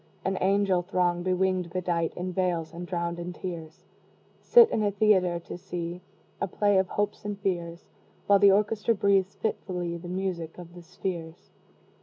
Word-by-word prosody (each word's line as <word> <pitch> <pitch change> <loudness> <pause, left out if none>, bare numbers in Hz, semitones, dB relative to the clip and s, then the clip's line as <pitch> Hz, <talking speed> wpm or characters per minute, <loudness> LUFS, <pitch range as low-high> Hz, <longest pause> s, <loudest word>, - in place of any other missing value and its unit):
An 190 - 0
angel 195 -1 +2
throng, 175 -1 0
bewinged, 185 -1 0
bedight 175 -2 -1
In 180 +1 -4
veils, 175 -3 -1
and 175 +1 -7
drowned 170 -1 -2
in 175 +1 -5
tears, 165 -4 -7 0.5
Sit 475 -2 +7
in - - +1
a 205 - +2
theatre, 195 -4 +3
to 170 - -8
see 175 -1 -5 0.4
A - - +1
play 205 +1 +2
of 190 - +1
hopes 205 +2 -2
and 205 -1 -4
fears, 175 -3 -3 0.4
While 200 -1 +5
the 200 - +7
orchestra 210 +3 +2
breathes 195 -1 +2
fitfully 180 -5 -3
The 175 +1 -9
music 180 -3 -3
of 175 -1 -11
the 175 - -11
spheres. 170 -1 -6
180 Hz, 165 wpm, -27 LUFS, 175-195 Hz, 0.5 s, Sit